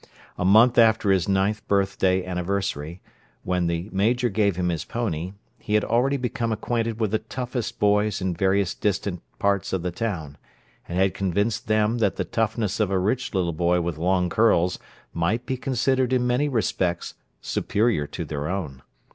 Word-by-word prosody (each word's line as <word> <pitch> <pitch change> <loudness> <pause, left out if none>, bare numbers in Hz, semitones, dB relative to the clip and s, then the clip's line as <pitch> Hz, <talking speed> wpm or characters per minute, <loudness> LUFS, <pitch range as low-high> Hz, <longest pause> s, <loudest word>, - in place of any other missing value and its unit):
A - - -3
month 110 +6 +6
after 110 -3 +4
his 95 -1 +1
ninth 100 +2 +1
birthday 95 -2 +1
anniversary, 90 -3 -3 0.4
when 90 -1 0
the 85 +2 -2
Major 120 +6 +1
gave 100 -2 +1
him 90 0 0
his 85 -3 -2
pony, 95 -6 -3 0.3
he 105 - -2
had 105 - +3
already 135 +4 +2
become 120 -2 -2
acquainted 115 0 -2
with 110 -3 0
the 110 - +1
toughest 125 -2 -4
boys 105 0 +2
in 95 -1 -1
various 95 +1 +1
distant 100 -3 -2 0.2
parts 100 -2 0
of 95 -3 -1
the 90 - -2
town, 85 -8 -4 0.5
and 85 - -3
had 95 0 +2
convinced 100 +4 -1
them 110 +2 +2
that 100 -4 +1
the - - -2
toughness 110 -2 -1
of 105 -3 +2
a 95 - +1
rich 110 +5 -1
little 85 -3 0
boy 85 +2 +2
with 85 -2 -3
long 90 +1 +2
curls 90 -3 +2 0.3
might 100 +9 0
be 130 - -2
considered 130 0 0
in 125 -1 +2
many 125 +4 +1
respects 95 -8 -1 0.3
superior 105 -8 0
to - - -5
their 75 -1 -4
own. 80 -8 -4
100 Hz, 170 wpm, -24 LUFS, 90-115 Hz, 0.5 s, month